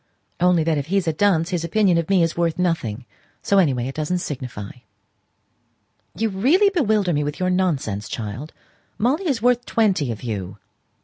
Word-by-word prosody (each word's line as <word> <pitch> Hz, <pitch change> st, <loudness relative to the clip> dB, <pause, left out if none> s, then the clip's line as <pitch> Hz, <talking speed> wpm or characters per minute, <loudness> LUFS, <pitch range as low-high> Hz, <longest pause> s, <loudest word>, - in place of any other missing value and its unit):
"Only 180 Hz, -2 st, +3 dB
that 155 Hz, -2 st, +1 dB
if 140 Hz, -, -5 dB
he's 190 Hz, 0 st, 0 dB
a 160 Hz, -, +1 dB
dunce 180 Hz, -1 st, +2 dB
his 175 Hz, -3 st, -1 dB
opinion 180 Hz, 0 st, +2 dB
of 165 Hz, -, -4 dB
me 190 Hz, -3 st, +4 dB
is 165 Hz, -, -1 dB
worth 170 Hz, -1 st, 0 dB
nothing. 135 Hz, -11 st, -1 dB, 0.4 s
So, 200 Hz, -, +3 dB
any 165 Hz, -7 st, +4 dB
way, 125 Hz, -1 st, -2 dB
it 135 Hz, -, -5 dB
doesn't 155 Hz, +4 st, -1 dB
signify." 125 Hz, -, -6 dB, 1.5 s
"You 225 Hz, +1 st, 0 dB
really 295 Hz, -, +3 dB
bewilder 215 Hz, -, +1 dB
me 150 Hz, 0 st, 0 dB
with 145 Hz, 0 st, -4 dB
your 185 Hz, 0 st, +1 dB
nonsense, 140 Hz, -, -1 dB
child. 115 Hz, +7 st, -5 dB, 0.5 s
Molly 290 Hz, -, 0 dB
is 250 Hz, -7 st, -1 dB
worth 245 Hz, 0 st, +3 dB
twenty 195 Hz, -, +1 dB
of 110 Hz, -, -7 dB
you." 100 Hz, -4 st, -5 dB
170 Hz, 180 wpm, -22 LUFS, 140-200 Hz, 1.5 s, me